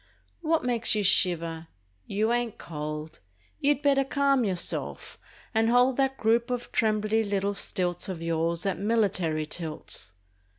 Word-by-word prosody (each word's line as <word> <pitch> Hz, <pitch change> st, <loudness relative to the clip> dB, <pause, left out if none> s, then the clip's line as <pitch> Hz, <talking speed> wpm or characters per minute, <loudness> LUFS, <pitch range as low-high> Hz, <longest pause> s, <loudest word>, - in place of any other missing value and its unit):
What 325 Hz, 0 st, +1 dB
makes 235 Hz, -3 st, +2 dB
you 210 Hz, -, 0 dB
shiver? 170 Hz, -4 st, +2 dB, 0.4 s
You 215 Hz, +3 st, +1 dB
ain't 240 Hz, -2 st, -1 dB
cold! 150 Hz, -1 st, -6 dB, 0.4 s
You'd 290 Hz, 0 st, +1 dB
better 275 Hz, -1 st, +4 dB
calm 275 Hz, -1 st, +2 dB
yourself 185 Hz, -5 st, -3 dB, 0.3 s
and 225 Hz, 0 st, +3 dB
hold 245 Hz, +1 st, +4 dB
That 270 Hz, -1 st, +1 dB
group 230 Hz, +2 st, +2 dB
of 245 Hz, -1 st, -3 dB
trembly 215 Hz, 0 st, +1 dB
little 200 Hz, -1 st, -1 dB
stilts 180 Hz, -2 st, -1 dB
Of 185 Hz, -3 st, -4 dB
yours 165 Hz, +1 st, -1 dB
at 195 Hz, -3 st, -1 dB
military 195 Hz, -8 st, +1 dB
tilts! 155 Hz, -, -5 dB
210 Hz, 135 wpm, -27 LUFS, 170-240 Hz, 0.4 s, better